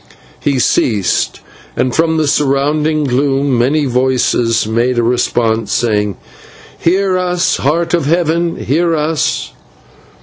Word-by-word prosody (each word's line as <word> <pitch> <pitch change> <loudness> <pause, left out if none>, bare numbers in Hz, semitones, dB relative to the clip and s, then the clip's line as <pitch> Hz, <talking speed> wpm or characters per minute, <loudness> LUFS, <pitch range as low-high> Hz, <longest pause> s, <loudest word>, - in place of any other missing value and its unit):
He 140 -2 0
ceased, 110 -5 0 0.4
and 125 -1 0
from 160 0 +1
the 155 -1 +1
surrounding 150 +2 +1
gloom 135 0 0
many 140 +5 +1
voices 125 -3 +1
made 120 +3 0
response, 115 -2 0
saying: 105 -4 0 0.6
"/Hear 185 +1 +1
us, 180 -1 0
Heart 165 +4 0
of 170 -5 +1
Heaven, 170 +1 0
hear 165 +4 0
us! 155 0 -1
140 Hz, 110 wpm, -14 LUFS, 120-160 Hz, 0.6 s, from